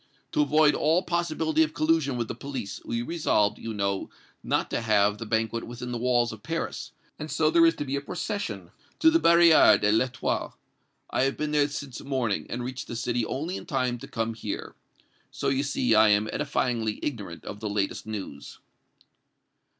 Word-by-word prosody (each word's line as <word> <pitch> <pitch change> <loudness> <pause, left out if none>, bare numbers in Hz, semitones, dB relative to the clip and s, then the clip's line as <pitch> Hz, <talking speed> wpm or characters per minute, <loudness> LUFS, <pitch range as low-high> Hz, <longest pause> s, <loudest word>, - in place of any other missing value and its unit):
To - - +2
avoid 150 +1 +4
all 165 +4 +2
possibility 160 -2 0
of 155 -1 +1
collision 155 -4 +1
with 120 -2 -2
the - - -4
police, 130 -8 -6
we 115 0 -2
resolved, 120 -9 +1
you 115 - -5
know, 100 -2 -2 0.3
not - - -1
to - - -1
have 105 -2 +2
the 115 - -6
banquet 110 +1 -1
within 120 +1 -6
the 120 - -3
walls 120 -1 +2
of 110 - -11
Paris, 165 +6 -4 0.3
and - - -6
so - - +2
there 335 -1 +6
is 330 - +2
to 145 - -4
be 135 0 -2
a 140 - -2
procession 140 - -4 0.3
to 320 - +5
the 330 - +4
Barrière 170 - +6
de 105 - +2
l'Etoile. 125 +3 -1 0.5
I 130 - +2
have 135 - -1
been 150 0 -2
there 145 -1 +3
since 140 -3 -7
morning, 130 -7 -1
and 120 +1 -4
reached 130 +1 -5
the 120 - -6
city 120 0 -1
only 165 +8 -3
in - - -10
time 130 -6 -1
to - - -9
come 115 0 -2
here. 110 - -5 0.6
So, - - -2
you 135 0 +1
see, 135 -4 +1
I 110 0 +6
am 105 +1 +3
edifyingly 120 -7 -1
ignorant 105 - -5
of 105 - -7
the 105 - -4
latest 100 +1 -2
news." 95 -10 -7
125 Hz, 190 wpm, -27 LUFS, 110-150 Hz, 0.6 s, there